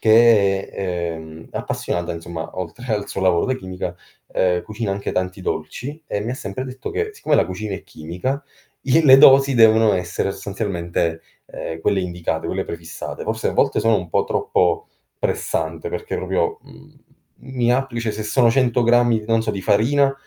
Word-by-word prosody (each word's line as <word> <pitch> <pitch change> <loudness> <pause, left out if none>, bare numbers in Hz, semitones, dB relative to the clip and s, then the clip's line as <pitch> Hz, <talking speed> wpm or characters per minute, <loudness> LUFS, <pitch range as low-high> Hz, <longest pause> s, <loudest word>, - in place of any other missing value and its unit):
che 110 -4 +5
è, 90 -3 -3
ehm, 80 0 -10
appassionata 85 -1 -3
insomma 85 0 -6
oltre 110 +7 -5
al 105 -1 -1
suo - - -4
lavoro 90 -3 +3
da 130 - +1
chimica, 95 -5 -5 0.4
ehm, 90 -1 +1
cucina 110 -1 -4
anche 100 +1 -3
tanti 90 +1 -2
dolci 125 - -4
e - - -1
mi 115 +5 -3
sempre 100 +1 -5
detto 130 0 -6
che 435 -1 -2
siccome 155 - +1
la - - +3
cucina 100 +2 -4
è - - -8
chimica, 90 - -4 0.4
i 140 +4 +4
le 135 -2 +9
dosi 135 -1 +7
devono 110 -2 +6
essere 95 +1 -2
sostanzialmente, 90 -5 -2 0.3
ehm, 80 0 -6
quelle 95 +3 +1
indicate, 85 -3 -3
quelle - - -2
prefissate. 85 -1 -7
Forse - - -2
a - - -1
volte - - +2
sono 115 0 +3
un 90 -3 -4
po' - - +1
troppo 435 -1 0 0.3
pressante, 445 - -2
perché 445 0 -4
proprio, 435 -1 -1
mhmm, - - -17 0.6
mi 120 -1 +2
appli 125 -2 -1
cioè 115 -1 -1
se 110 +1 -5
sono 115 +2 +3
100 125 -1 +2
grammi 120 -1 +3
non 115 0 +3
so, 110 - -1
di 95 -2 -5
farina, 135 +8 +3
110 Hz, 175 wpm, -21 LUFS, 90-130 Hz, 0.6 s, le